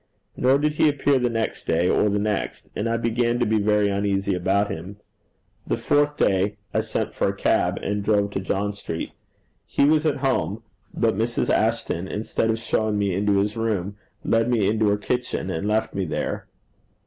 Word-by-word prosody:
Nor 130 +2 +3
did 150 +1 0
he 150 0 +4
appear 140 -1 +2
the 125 -1 +1
next 115 -1 -2
day 85 +2 +2
or 105 - +3
the 100 - 0
next, 105 0 -2
and 110 +3 -1
I 115 - +1
began 120 +1 0
to 120 - +1
be 110 0 +2
very 105 0 +2
uneasy 100 0 0
about 95 +3 +1
him. 95 +5 -7 0.7
The - - 0
fourth 145 0 +1
day 100 +2 +1 0.2
I - - +2
sent - - -3
for - - 0
a - - -3
cab, - - +1
and 100 0 -1
drove 100 -1 +2
to 95 - -2
John 100 +2 -1
Street. 85 -5 -5 0.6
He - - +2
was 155 +1 +3
at 150 - +1
home, 115 -4 0 0.3
but - - +1
Mrs. - - 0
Ashton, 85 +3 0
instead 110 +2 -1
of 110 - +1
showing 110 -1 0
me 100 -2 0
into 100 +2 +2
his 100 +2 0
room, 105 -4 -1 0.3
led 115 +1 +2
me 110 -5 +2
into 110 0 +2
her 100 - +2
kitchen, 125 -3 -2
and 95 +4 -2
left 110 +1 0
me 95 -1 -1
there. 80 - -3
105 Hz, 195 wpm, -24 LUFS, 100-115 Hz, 0.7 s, he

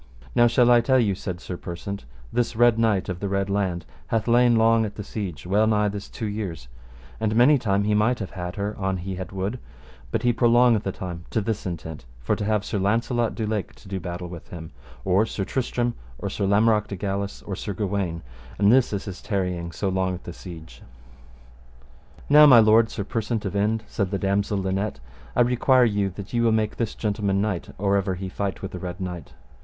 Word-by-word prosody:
Now 120 -1 +5
shall 120 +1 +4
I 120 -1 +6
tell 130 +2 +3
you, 110 -6 +2
said 90 -2 -5
Sir 90 0 -6
Persant, 90 +1 -6 0.3
this 120 -1 0
Red 120 -1 +4
Knight 110 -4 +2
of 90 -1 -4
the 100 - -3
Red 100 0 -1
Laund 95 -4 -1 0.2
hath 110 0 -1
lain 120 0 +5
long 115 0 +4
at 105 -2 -4
the 105 - -6
siege, 95 -6 -6
well 105 +4 +3
nigh 105 -1 +2
this 100 0 -6
two 110 - -5
years, 100 - -4 0.5
and 110 -1 0
many 130 +5 +6
times 100 -3 +1
he 105 - +2
might 110 +4 +2
have 100 -4 -6
had 90 -1 -5
her 100 +1 -3
an 95 -1 -1
he 95 +2 -5
had 95 -1 -6
would, 95 +6 -3 0.5
but - - -2
he 120 0 +3
prolongeth 120 -1 +4
the 95 - -3
time 90 -2 -7
to - - 0
this 110 -1 -2
intent, 80 -6 -6
for - - 0
to - - -4
have 105 -1 0
Sir 105 - -2
Launcelot 115 +3 0
du 110 - -2
Lake 105 -2 -3
to - - -17
do 95 0 -3
battle 90 0 -5
with 85 -2 -10
him, 80 -2 -9 0.3
or 95 +2 +4
Sir 95 - -3
Tristram, 120 -1 -1 0.2
or - - -4
Sir 100 - -1
Lamorak 105 +1 +3
de 100 - -5
Galis, 100 +1 -3
or 100 - -5
Sir 100 - -4
Gawaine, 95 -5 -2 0.3
and 100 +1 +4
this 130 0 +4
is 100 - -3
his 95 -3 -7
tarrying 90 -4 -2
so 100 - -3
long 95 -1 0
at 90 - -10
the 85 - -7
siege. 85 -3 -11 1.5
Now 150 +1 +8
my 130 -4 +9
lord 110 +1 +5
Sir 100 - -4
Persant 110 +1 -2
of 95 - -3
Inde, 110 +2 +1
said 100 -2 -2
the 100 - -1
damosel 100 +1 0
Linet, 95 +2 -2 0.4
I - - +4
require 125 +1 +4
you 100 -3 +1
that 100 +1 -8
ye 120 - +2
will 115 -1 +3
make 110 -1 0
this 115 -3 -2
gentleman 100 -2 0
knight 100 -4 -2
or 100 0 +2
ever 95 -1 -1
he 95 +1 -5
fight 100 -1 -4
with 95 - -4
the 90 - -6
Red 90 +1 -6
Knight. 90 -5 -6
100 Hz, 220 wpm, -24 LUFS, 95-110 Hz, 1.5 s, my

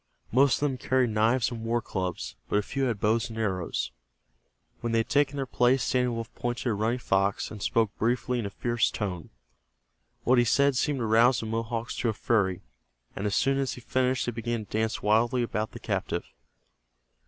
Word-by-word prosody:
Most 135 +2 +5
of - - -6
them 135 -3 0
carried 130 -2 +1
knives 115 +4 +2
and 115 -2 -6
war 115 +1 +1
clubs, 95 -6 -4
but - - 0
a 105 - +3
few 135 +5 -2
had 115 -5 -1
bows 110 +2 +1
and 115 - -8
arrows. 95 -6 -2 0.9
When 115 -1 -2
they - - +3
had 115 - 0
taken 145 -1 +2
their 135 -1 -2
places 125 +1 +2
Standing 125 -1 +1
Wolf 115 0 -6
pointed 120 +1 -2
at - - 0
Running 110 +4 0
Fox, 100 -4 0
and 105 -2 -8
spoke 110 0 +1
briefly 125 +2 0
in 110 - -2
a - - -5
fierce 120 +3 0
tone. 90 -6 -4 0.9
What 125 0 +4
he - - +5
said 140 +3 +3
seemed 145 +2 +1
to - - 0
rouse 115 +3 +4
the - - -5
Mohawks 115 +1 -3
to 120 - 0
a - - 0
fury, 100 -5 0 0.5
and 100 - -2
as 100 - 0
soon 135 0 +2
as 135 -1 -1
he 125 - -9
finished 130 +1 0
they 120 - -1
began 115 -1 -3
to - - -30
dance 110 +1 -1
wildly 115 +4 +3
about 110 -1 -3
the - - -8
captive. - - -2
115 Hz, 205 wpm, -28 LUFS, 110-125 Hz, 0.9 s, Most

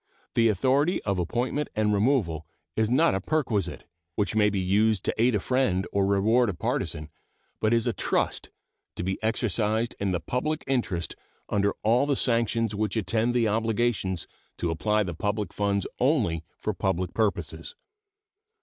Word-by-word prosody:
The 115 -1 +4
authority 135 - +2
of 100 -2 0
appointment 125 - -1
and 105 -1 +2
removal 100 - +1 0.3
is 110 -1 +1
not 155 +7 +4
a 95 - -1
perquisite, 120 - -1 0.3
which 105 +1 0
may 105 -1 +4
be 100 -1 -1
used 100 +2 +2
to - - +1
aid 120 -1 +4
a - - +2
friend 105 -6 +1
or 100 -1 +2
reward 110 +4 +3
a 95 - -3
partisan, 75 -2 -3 0.5
but 110 - +1
is 115 -1 +2
a - - +1
trust, - - -1 0.5
to - - -4
be 95 +1 -2
exercised 110 +1 0
in 100 -1 0
the 90 - 0
public 150 - -2
interest 115 -11 -1 0.3
under 100 0 +1
all 120 +6 +3
the 140 - +2
sanctions 115 -3 +1
which 105 0 -1
attend 110 +4 +1
the 120 -2 +3
obligation 110 -2 0 0.4
to 85 - -1
apply 105 +6 +1
the 90 -3 -4
public 105 +3 -2
funds 100 -2 0
only 120 - +2
for 110 - -2
public 90 -2 -1
purposes. 110 - -2
110 Hz, 160 wpm, -27 LUFS, 95-120 Hz, 0.5 s, The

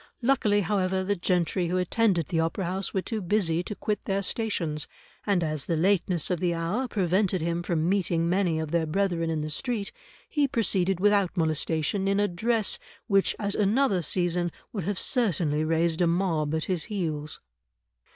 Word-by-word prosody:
Luckily, 220 -5 +3
however, 190 0 0
the 200 +2 0
gentry 175 0 0
who 180 +2 0
attend 190 +2 +2
at 165 -4 -2
the 165 - 0
Opera 165 +4 -1
House 185 +2 -2
were 190 - -1
too 220 -2 -3
busy 175 -3 +1
to 205 +3 -6
quit 210 +1 -3
their 195 0 -1
stations, 175 -9 -1 0.4
and 195 -4 +2
as 155 -3 -1
the 165 - 0
lateness 180 -1 +1
of 180 - 0
the 175 -1 0
hour 180 +11 -1
prevented 190 -2 +1
him 170 +1 -1
from 170 -2 -1
meeting 175 -3 +1
many 175 -2 +1
of 160 -1 -4
their 170 -2 +1
brethren 170 -1 0
in 160 -2 -1
the 155 - -3
street, 230 - -2 0.4
he 290 -2 +1
proceeded 195 -6 +1
without 200 -2 +2
molestation 160 +3 +1
in 200 +1 +2
a 205 - +3
dress, 215 +4 0 0.3
which 195 -3 +2
at 200 -1 -2
another 210 -1 +2
season 175 0 0 0.2
would 195 -7 -3
have 200 0 -2
certainly 170 - +1
raised 165 +1 +1
a 175 - +4
mob 165 -4 0
at 160 - -1
his 180 -4 -1
heels." 155 -8 -3
180 Hz, 180 wpm, -27 LUFS, 165-200 Hz, 0.4 s, a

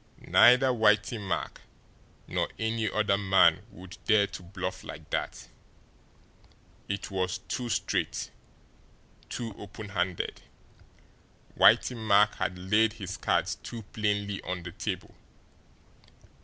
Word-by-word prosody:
Neither 125 +2 +6
Whitey 110 -1 +2
Mack 95 -3 -3 0.7
nor - - -1
any 110 -1 -1
other 100 -2 +1
man 95 -3 +4
would 95 -1 -12
dare 110 -3 +5
to 95 - -9
bluff 90 0 -5
like - - -9
that. - - -3 1.4
It 100 +1 -4
was 95 -1 -1
too 125 -2 -3
straight, - - -1 1.0
too 115 -3 -5
open 105 +1 -9
handed, 90 -2 -2 1.1
Whitey 125 - +5
Mack 105 -2 +4
had 90 - -2
laid 105 +4 +2
his 95 -4 -6
cards - - 0
too 115 -2 -7
plainly 105 -2 -1
on 90 -1 -5
the 90 - -7
table. 95 0 -5
100 Hz, 115 wpm, -28 LUFS, 95-110 Hz, 1.4 s, Neither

